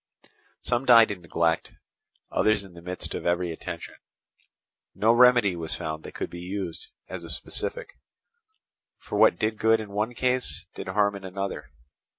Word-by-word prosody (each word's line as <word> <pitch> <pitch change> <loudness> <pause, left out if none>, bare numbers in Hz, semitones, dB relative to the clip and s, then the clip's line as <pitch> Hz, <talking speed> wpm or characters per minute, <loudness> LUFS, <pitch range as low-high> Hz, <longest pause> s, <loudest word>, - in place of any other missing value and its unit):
Some 120 +2 0
died 115 -4 +7
in 95 -3 -6
neglect, 85 0 0 0.6
others 110 -2 +2
in 95 -2 -14
the 85 - -12
midst 90 +1 -5
of - - -4
every 85 0 +1
attention. - - -7 1.0
No 110 +2 +4
remedy 120 -5 +5
was 80 -2 -4
found 80 -2 -5
that - - -9
could - - -4
be 85 - -7
used 90 -2 -5 0.2
as 95 -2 -7
a 85 - -8
specific; - - -4 1.0
for - - -4
what - - +6
did 110 0 -1
good 110 0 +4
in 105 -2 -7
one 105 +4 -2
case, 125 -7 0
did - - -7
harm 100 +1 +2
in 100 - -9
another. 95 -5 -5
100 Hz, 160 wpm, -26 LUFS, 85-110 Hz, 1.0 s, died